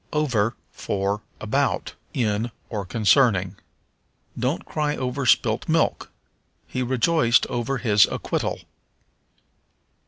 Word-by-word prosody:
Over 120 -7 +1 0.2
for 100 +1 -2 0.2
About, - - -1 0.2
In, 110 -2 0 0.2
or 100 -4 -4
Concerning. 105 -4 +3 0.8
"Don't 130 +6 -2
cry 150 -1 -1
over 130 +1 -2
spilt - - +2
milk." - - +1 0.6
"He 130 - -4
rejoiced 125 0 +3
over 120 +3 -1
his 105 -5 +4
acquittal." - - -3
120 Hz, 95 wpm, -24 LUFS, 105-135 Hz, 0.8 s, his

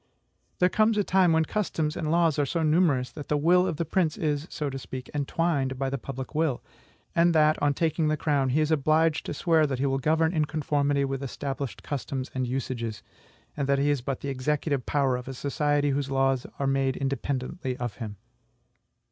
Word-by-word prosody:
There 180 - +4
comes 215 +3 +2
a 205 - +3
time 185 -2 +3
when 160 0 +3
customs 160 -6 -1
and 155 - -2
laws 165 -2 +3
are 145 - +3
so 165 +2 -1
numerous 150 -6 +2
that 145 -2 -8
the 150 - +1
will 180 +5 +4
of 170 -5 -2
the 170 - -1
prince 160 -1 0
is, 150 0 -1
so 150 - -3
to 135 -1 -4
speak, 130 0 -8
entwined 145 -2 0
by 135 0 -1
the 140 - -2
public 135 +2 -7
will; 155 -5 0 0.5
and 170 0 +4
that, 155 0 +4
on 145 -1 +2
taking 160 0 +1
the 155 0 +1
crown, 140 -4 +1
he 145 +5 +2
is 155 +1 +1
obliged 155 +1 +2
to - - -2
swear 160 -1 +3
that 135 -2 -2
he 135 - 0
will 135 0 +1
govern 160 +4 +2
in 155 -3 +2
conformity 145 -2 0
with 135 0 -3
established 140 0 -5
customs 135 -2 -4
and 130 -1 -1
usages; 120 -3 -3 0.5
and 140 -2 -2
that 140 - +4
he 145 +1 +2
is 145 -3 0
but 135 +1 -4
the 140 - -3
executive 140 0 -1
power 135 -3 +2
of 125 - -8
a 135 - -5
society 145 +1 0
whose 140 0 -1
laws 135 -1 +1
are 140 - -1
made 135 -1 +1
independently 135 0 -3
of 120 -3 -4
him. 110 -4 -6
145 Hz, 205 wpm, -27 LUFS, 135-160 Hz, 0.5 s, There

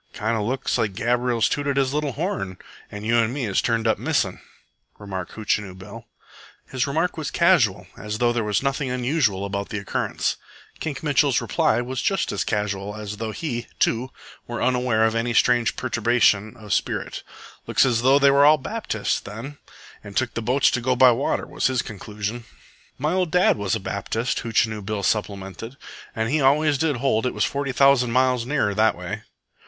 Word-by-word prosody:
"Kind 110 +2 -1
of 110 - -1
looks 130 +1 -1
like 105 -4 -1
Gabriel's 120 +1 +1
tooted 140 -1 -1
his 135 -1 +1
little 150 -2 -1
horn, 155 - -3 0.3
and 105 +1 -8
you 115 +2 +3
an' 115 -1 +2
me 135 +1 -3
has 100 -4 +1
turned 115 -1 0
up 110 - +2
missing," - - -1 0.6
remarked 95 -3 -6
Hootchinoo 105 -3 -2
Bill. 105 +5 -11 0.6
His 130 +2 -2
remark 160 +5 -1
was 155 - -3
casual, 170 - +3
as 105 0 -5
though 120 +1 +2
there 120 -1 0
was 105 +2 0
nothing 140 0 -1
unusual 125 -6 0
about 100 0 -4
the 105 - -3
occurrence. 100 - -2 0.4
Kink - - -4
Mitchell's - - +3
reply 115 - +1
was 125 +1 -4
just 195 - 0
as - - -1
casual 105 -1 -2
as 105 -1 -6
though 110 +1 -3
he, 120 -1 -4
too, 120 +3 +1 0.4
were 120 -1 -4
unaware 125 -3 +2
of 110 - +1
any 115 +1 -1
strange 120 -1 +3
perturbation 115 -2 +1
of 105 -3 -4
spirit. - - -2 0.5
"Looks - - +3
as 120 -3 +1
they 130 - +3
was 140 0 +5
all 150 +1 +7
Baptists, 150 - -2
then, 120 +8 -9 0.4
and 100 -1 -8
took 130 -3 0
the 115 - -3
boats 125 +5 +3
to 120 - -1
go 130 +1 +1
by 125 0 +7
water," 120 +4 -1
was - - -1
his 130 -3 0
contribution. 105 +3 -6 0.5
"My 150 +5 -1
ol' 185 -1 +1
dad 180 +3 +3
was 100 -1 -1
a - - -2
Baptist," 110 +5 -2
Hootchinoo 110 -2 0
Bill 100 0 -3
supplemented. 100 +3 -3 0.4
"An' 110 -1 -1
he 150 +2 +1
always 145 +1 +3
did 160 -2 +1
hold 125 -2 +1
it - - -3
was - - +2
forty 140 -1 -2
thousand 135 -2 +4
miles 125 -1 +2
nearer 130 -8 +1
that 110 +2 +3
way." 95 +5 -5
120 Hz, 185 wpm, -23 LUFS, 105-135 Hz, 0.6 s, all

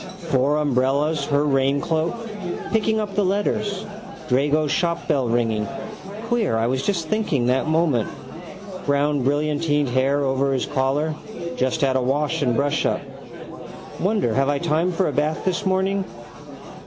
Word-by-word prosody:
Four 135 +3 +3
umbrellas, 140 +1 +1
her 145 0 +2
raincloak. 140 +4 +1 0.6
Picking 220 0 +2
up 210 -2 -3
the 205 +1 +1
letters. 205 +1 -1 0.4
Drago's 145 +3 +2
shopbell 165 -7 0
ringing. 115 -3 +1 0.6
Queer 225 - +1
I 115 - +1
was 130 +2 0
just 175 -6 -1
thinking 160 - 0
that 130 +4 +1
moment. 155 -8 +2 0.8
Brown 145 -1 +2
brillantined 145 +1 +1
hair 135 +3 +2
over 135 0 +1
his 130 - 0
collar. 140 +4 0 0.4
Just 130 +6 0
had 135 -2 +2
a 130 - +2
wash 145 +5 0
and 125 -4 +2
brushup. 140 0 +1 1.0
Wonder 195 - +1
have 135 +3 +2
I 145 - +1
time 165 +3 +1
for 180 +1 0
a - - 0
bath 150 +1 -1
this 190 +2 0
morning. 190 +1 +1
145 Hz, 140 wpm, -22 LUFS, 135-170 Hz, 1.0 s, Four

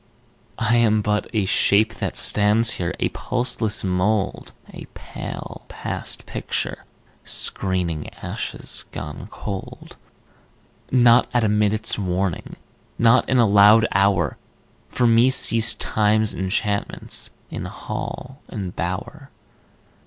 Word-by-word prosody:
I 115 +1 +2
am 110 -2 +3
but 105 0 -1
a 105 -4 0
shape 105 +3 +2
that - - -4
stands 105 +2 +4
here, 90 0 -3
A - - 0
pulseless 120 -4 -2
mould, 95 +2 -1 0.2
A - - -9
pale - - -8
past - - -5
picture, - - -4 0.4
screening 90 -5 -1
Ashes - - -5
gone 75 -1 -7
cold. 100 -3 -8 0.9
Not 120 -1 +5
at 120 - +3
a - - +3
minute's 105 +1 +1
warning, 90 -2 -2 0.4
Not 115 +1 +3
in 130 - +2
a 120 - +5
loud 105 +2 +6
hour, 100 -2 +1 0.5
For 125 - 0
me 115 +2 +5
ceased 115 -3 +4
Time's 110 0 +1
enchantments 100 +2 -1 0.2
In - - -5
hall 135 +3 -7
and 95 -4 -6
bower. 105 - -5
105 Hz, 115 wpm, -22 LUFS, 95-115 Hz, 0.9 s, loud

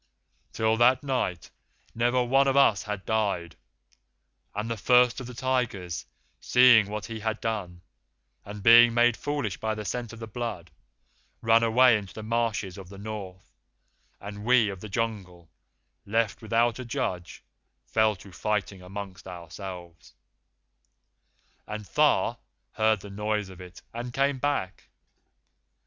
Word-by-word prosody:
"Till 110 0 +1
that 125 +3 +4
night 125 - -2 0.4
never 120 +2 +2
one 135 +3 +3
of 135 0 +2
us 125 -7 +5
had 105 -2 -5
died, 100 -7 -1 1.0
and 105 +2 -3
the 115 - -2
First 125 +3 +4
of 125 - -7
the 125 - -9
Tigers, 115 -9 -2 0.3
seeing 125 -4 +6
what 105 0 -4
he 115 -1 -6
had 110 0 -2
done, 95 -6 -4 0.6
and 105 0 -9
being 115 +1 +8
made 120 0 +4
foolish 145 -9 -3
by 110 0 -2
the 105 -1 -6
scent 120 +1 -4
of 115 - -10
the 115 - -6
blood, 110 -6 -5 0.7
ran 115 0 +5
away 115 0 +5
into 100 -2 -11
the 110 - -7
marshes 110 -4 -2
of 95 -2 -11
the 100 - -11
North, 100 -3 -8 0.7
and 100 0 -8
we 120 -2 +4
of 95 -2 -6
the 110 - -9
Jungle, 95 -6 -4 0.5
left 115 0 -1
without 115 +2 +1
a - - -4
judge, 90 -7 -4 0.4
fell 110 -1 +2
to 95 +1 -14
fighting 100 0 -2
among 95 +1 -7
ourselves; 90 -1 -9 1.5
and 105 0 -6
Tha - - +2 0.3
heard 110 -2 +1
the 100 - -10
noise 105 0 -2
of 95 -1 -12
it 90 -1 -12
and 120 +1 -5
came 135 +1 0
back. 125 -10 -2
110 Hz, 145 wpm, -27 LUFS, 95-120 Hz, 1.5 s, being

